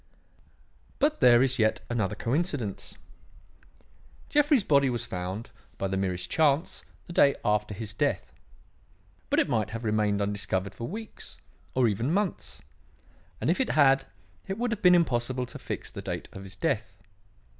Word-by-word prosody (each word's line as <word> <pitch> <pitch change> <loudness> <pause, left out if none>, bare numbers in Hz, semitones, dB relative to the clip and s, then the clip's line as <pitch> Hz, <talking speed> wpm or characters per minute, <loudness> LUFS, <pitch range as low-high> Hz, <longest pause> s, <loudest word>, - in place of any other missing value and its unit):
"But 300 +2 +2
there 120 0 +7
is 130 -1 +1
yet 110 0 +2
another 110 -4 -1
coincidence. 125 - -2 1.3
Jeffrey's 290 -5 +4
body 140 -4 +4
was 120 -2 -2
found, 95 +4 -5 0.3
by 95 - -1
the 95 - -2
merest 90 -2 -1
chance, 155 0 +1 0.2
the 175 - -9
day 140 -4 +5
after 105 -1 +1
his 110 +1 -5
death. - - -1 1.0
But - - +3
it - - +3
might 110 -3 0
have 115 +2 -6
remained 105 -2 +1
undiscovered 100 -1 -2
for 115 +5 -6
weeks, 220 +4 -8 0.4
or 130 -2 +4
even 115 +7 0
months; 195 -1 -2 0.8
and - - +1
if 185 - +1
it 260 - 0
had, 135 -2 +4 0.4
it 195 - -3
would 240 +1 -1
have 220 -2 -3
been 180 -1 +7
impossible 130 -6 +1
to - - -10
fix - - -5
the - - -7
date - - -5
of 95 0 -9
his 95 0 -9
death. 115 -9 -2
120 Hz, 155 wpm, -28 LUFS, 105-160 Hz, 1.3 s, there